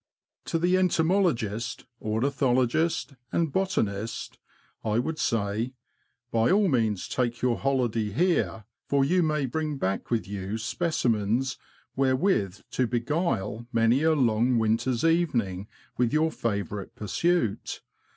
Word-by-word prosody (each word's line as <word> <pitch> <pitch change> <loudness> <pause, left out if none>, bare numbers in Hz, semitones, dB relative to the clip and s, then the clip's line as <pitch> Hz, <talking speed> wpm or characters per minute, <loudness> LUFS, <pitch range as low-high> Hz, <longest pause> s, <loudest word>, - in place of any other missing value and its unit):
To - - 0
the 175 +3 +3
entomologist, 160 - +1 0.2
ornithologist, 130 +6 +1 0.2
and 165 -4 0
botaniet, 110 - -1 0.5
I 110 -1 0
INTRODUCTORY. - - +3
would 155 +5 -2
say, 110 +2 0 0.3
*' 120 0 -47
By 115 0 +3
all 200 +2 +4
means 110 - +1
take 120 -1 -2
your 125 -2 +2
holiday 120 -6 0
here, 110 - 0 0.2
for 140 -1 +3
you 180 +5 +3
may 150 -3 +1
bring 150 +3 -2
back 95 -6 -2
with 115 -3 0
you 100 +1 -4
specimens 120 - 0 0.4
wherewith 130 - +1
to 125 - +1
beguile 120 - -1
many 115 +3 +3
a 160 0 +4
long 120 -3 +2
winter's 115 +2 +1
evening 120 - +1 0.3
with 120 -1 +2
your 160 +1 +3
favourite 100 - -3
pursuit. 115 - -1
120 Hz, 125 wpm, -27 LUFS, 110-155 Hz, 0.5 s, all